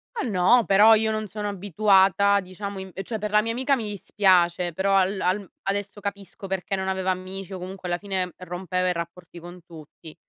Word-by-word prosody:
Ma 275 - -2
no, 215 +4 +4
però 210 +3 +6
io 220 0 +1
non 215 0 -3
sono 205 +1 -4
abituata, 200 +1 +3
diciamo 195 +1 -7
imp 190 0 -7
cioè 220 +3 -4
per 210 0 -4
la 210 - +5
mia 225 +1 -2
amica 260 +4 +1
mi 225 -5 -4
dispiace, 180 -4 +2
però 195 +3 +1
al 190 +1 +2
al 190 +1 -1
adesso 200 +1 -3
capisco 200 -1 -7
perché 190 +1 -2
non 190 0 -3
aveva 190 0 0
amici 185 +1 -6
o 185 - -6
comunque 185 0 -7
alla 175 0 -1
fine 190 -3 -3
rompeva 185 0 -2
i 180 - +1
rapporti 170 +1 -8
con 175 +1 -11
tutti. 160 -1 -13
190 Hz, 200 wpm, -24 LUFS, 180-205 Hz, -, però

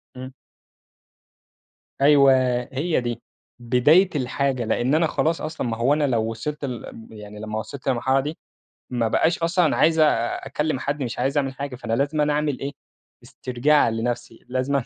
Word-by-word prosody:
إمم. 130 +1 -8 1.7
أيوه، 140 -1 +6 0.4
هي 150 +3 0
دي 120 -1 -4 0.4
بداية 140 +10 +4
الحاجة 130 -2 -1
لأن 120 +6 +1
أنا 165 +1 +3
خلاص 160 +2 0
أصلًا، 155 -5 -4
ما 115 -1 -3
هو 125 +5 +2
أنا 150 0 +1
لو 115 -3 0
وصِلت 145 +6 -5
لل 125 -3 -5
ام 110 - -11
يعني 105 -1 -10
لما 110 0 -4
وصِلت 135 +4 -8
للمرحلة 130 +1 +2
دي 150 +4 -4 0.5
ما 120 -2 0
بقاش 165 +10 +1
أصلًا 170 +1 +2
أنا 155 - +1
عايز 160 +1 +3
أ 155 - +7 0.4
أكلّم 150 -3 -2
حد، 145 0 -2
مش 120 - -5
عايز 135 +2 0
أعمل 135 -2 0
حاجة، 140 -1 -6
فأنا 115 -2 -4
لازمًا 145 +4 +1
أعمل 150 -3 -1
إيه، 140 - -4 0.5
استرجاع 130 +2 +1
لنفْسي، 115 0 -4
لازمًا 130 +1 0
135 Hz, 165 wpm, -23 LUFS, 120-150 Hz, 1.7 s, أ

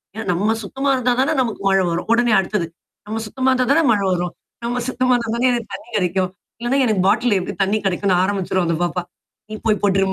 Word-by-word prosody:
என்னா 220 -1 -5
நம்ம 210 +6 +1
சுத்தமா 270 +7 -2
இருந்தா 250 -1 +1
தானே 305 +4 +2
நமக்கு 230 -5 -3
மழை 195 -1 +3
வரும். 175 +4 -3
உடனே 240 -1 +3
அடுத்தது. 190 -2 -1 0.4
நம்ம 220 +1 -3
சுத்தமா 260 +4 0
இருந்தா 255 -1 +1
தானே 325 +3 +4
மழை 200 -2 +1
வரும். 175 0 -2 0.3
நம்ம 245 +1 -1
சுத்தமா 255 0 +1
இருந்தா 230 -2 -2
தானே 250 +2 +2
எனக்கு 235 -2 -3
தண்ணீ 240 - -12
கெடைக்கும். 185 0 0 0.3
இல்லன்னா 240 +3 0
எனக்கு 210 -5 +1
பாட்டில் 220 -1 +3
எப்டி 200 +3 -5
தண்ணீ 210 +3 +1
கெடைக்கும்ன்னு 185 -1 +1
ஆரம்பிச்சுரும் 190 -2 0
அந்த 165 -1 0
பாப்பா. 175 0 -1 0.5
நீ 215 - -5
போய் 215 -2 +2
போட்ரு 195 -1 +3
215 Hz, 205 wpm, -20 LUFS, 190-245 Hz, 0.5 s, தானே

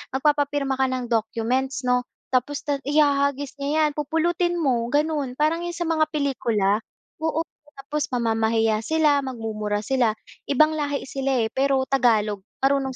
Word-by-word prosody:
Magpapapirma 285 -1 +1
ka 265 - +3
ng 255 -2 -3
documents 235 +4 -1
'no, 250 0 +1 0.2
tapos 260 +3 0
no'n 285 -2 -1
ihahagis 285 -1 +1
niya 295 +3 +1
yan - - 0
pupulutin 325 +4 0
mo 250 -8 +1
gano'n, 290 -2 0
parang 330 +4 0
yung 345 - -5
sa 345 - -2
mga 320 -2 +1
pelikula, 235 -9 0 0.4
oo. 320 0 0 0.3
Tapos 285 +2 -3
mamamahiya 225 -2 +1
sila, 300 +4 +2
magmumura 220 -5 -3
sila, 240 -2 +1 0.3
ibang 305 +3 +4
lahi 285 -1 -2
sila, 270 -2 -1
eh, 220 - -2
pero 270 0 +2
Tagalog 225 -6 +2 0.2
marunong 270 -1 +1
270 Hz, 145 wpm, -24 LUFS, 240-295 Hz, 0.4 s, ibang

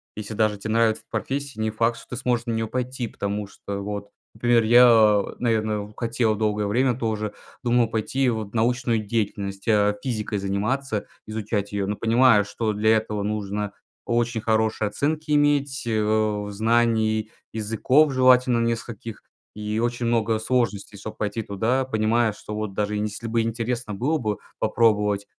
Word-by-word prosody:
если 105 0 -6
даже 110 -2 +1
те 110 - -5
нравится 115 0 +2
эта - - -34
профессия, 135 +2 -4
не 110 0 0
факт 115 +1 +1
что - - -14
ты 125 - -4
сможешь 120 -1 0
на 120 - -2
нее 115 0 -1
пойти. 125 0 -3
Потому 100 0 -3
что 100 0 -6
вот, 100 0 -5 0.2
например, 120 +1 +3
я, 110 -3 +6
наверное, 110 -3 -1
хотел 115 -2 0
долгое 105 -1 0
время 120 +4 +2
тоже 110 -3 -2 0.3
думал 120 -1 +3
пойти 125 +4 0
вот 110 -3 -3
в - - -13
научную 120 0 +1
деятельность, 100 -2 -3
а, 105 -2 +3
физикой 110 -5 -2
заниматься, 105 +5 -1 0.2
изучать 105 -1 -3
ее. 100 -1 -1
Но 105 +1 -2
понимаю, 115 -2 +4
что 110 +1 -2
для 110 +2 +3
этого 105 -1 -3
нужно 105 -1 -3 0.3
очень 120 -1 0
хорошие 110 -1 +1
оценки 150 +8 -2
иметь, 145 -2 +2
э, 110 -1 +1
знаний 110 0 +1 0.2
языков, 115 +7 +2
желательно 125 -2 +4
нескольких, 115 -1 -4 0.3
и 105 +1 -3
очень 120 +1 -1
много 115 -1 +1
сложностей 110 -3 -1
чтобы 110 +2 -8
пойти 105 +2 -2
туда, 110 +6 0
понимая, 110 -1 +1
что 105 - -9
вот 105 -2 -3
даже 105 +1 -1
если 105 +2 -4
бы 115 0 +1
интересно 115 0 -2
было 145 +10 0
бы 105 -3 -2 0.2
попробовать, 105 -2 +2
110 Hz, 160 wpm, -24 LUFS, 105-120 Hz, 0.3 s, я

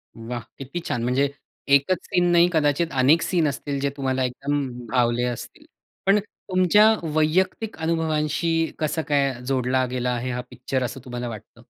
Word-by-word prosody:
वाह! 120 +1 -5 0.2
किती 140 +6 -5
छान. 120 -1 -1
म्हणजे 130 +3 +2 0.5
एकच 140 +7 +2
सीन 180 - +1
नाही, 175 0 +6
कदाचित 155 +2 +2
अनेक 145 +6 +5
सीन 170 -4 +1
असतील 140 0 -4
जे 140 +1 0
तुम्हाला 130 -1 0
एकदम 140 +3 -1 0.2
भावले 120 -1 +2
असतील. 120 -2 -7 0.4
पण 195 +2 +5
तुमच्या 200 +2 +3 0.2
वैयक्तिक 185 +8 +1
अनुभवांशी 160 0 0
कसं 155 +1 0
काय 140 -2 +2
जोडला 130 -1 +1
गेला 125 -1 -1
आहे 125 +1 -3
हा 125 - -3
पिक्चर, 130 +1 -3
असं 125 +2 -4
तुम्हाला 125 -1 -4
वाटतं? 110 -3 -11
140 Hz, 155 wpm, -24 LUFS, 125-165 Hz, 0.5 s, नाही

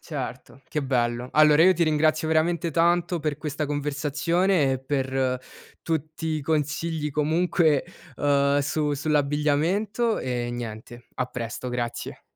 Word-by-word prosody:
Certo, 135 -2 -7
che 150 - -2
bello. 120 -2 0
Allora, 155 +1 +6
io 185 - +7
ti 170 0 +2
ringrazio 155 0 +2
veramente 165 +1 +1
tanto 170 +1 +2
per 150 -2 -2
questa 150 0 -3
conversazione, 145 +3 +1
e 130 - -1
per 130 -1 -1 0.4
tutti 160 0 -3
i 155 -1 -1
consigli 155 +1 -1
comunque, 155 0 +2 0.3
uhm, 140 0 +2
su 150 +1 -1
sull'abbigliamento, 155 - +1
e 120 -1 -2
niente. 120 0 -7
A 125 - -1
presto, 120 +1 -5
grazie. 120 -1 -4
150 Hz, 125 wpm, -25 LUFS, 135-160 Hz, 0.4 s, io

